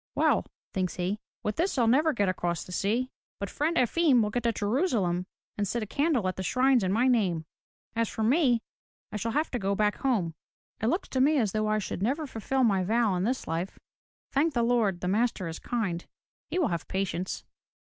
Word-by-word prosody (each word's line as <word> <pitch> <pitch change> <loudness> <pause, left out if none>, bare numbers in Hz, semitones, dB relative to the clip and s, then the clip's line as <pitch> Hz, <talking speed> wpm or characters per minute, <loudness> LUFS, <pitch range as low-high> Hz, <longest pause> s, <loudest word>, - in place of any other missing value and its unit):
"Well," - - +2 0.3
thinks 185 -2 -1
he, 185 +4 -1 0.3
*Vith 210 - -1
this 360 +4 +1
Fll 240 -4 +3
never 295 +7 +4
get 205 -8 +1
across 175 -2 -1
the - - -11
sea. 225 +8 0 0.3
But 200 - -4
Friend 320 +3 0
Efim 255 -1 +4
will 210 - -1
get 245 - 0
to 235 0 +2
Jerusalem 205 - 0 0.3
and 205 - +1
set 235 +3 -1
a - - -3
candle 280 - +1
at 185 - -2
the - - -3
shrines 255 +5 +3
in 185 - +1
my 235 +6 +3
name. 190 -10 +2 0.5
As 230 -1 +1
for 220 - -3
me, 245 -1 +3 0.5
I 210 - -3
shall 225 +2 -2
have 305 +2 0
to 245 - -1
go 200 -1 0
back 210 0 +1
home. 210 -12 0 0.5
It 220 - +1
looks 340 - -1
as 260 -5 +3
though 215 +1 0
I 215 0 +2
should 200 -3 -4
never 275 +9 0
fulfill 260 +1 -1
my 195 -5 +3
vow 220 +1 +2
in 180 +1 0
this 255 +3 -1
life. 165 +4 -3 0.5
Thank 290 +2 +2
the 235 - +3
Lord, 225 -7 +2
the 180 - -2
Master 210 -2 +1
is 165 - -5
kind. 195 -8 -2 0.4
He - - -3
will 345 -9 +2
have 170 -4 -3
patience." 190 -1 -2
220 Hz, 210 wpm, -28 LUFS, 190-255 Hz, 0.5 s, never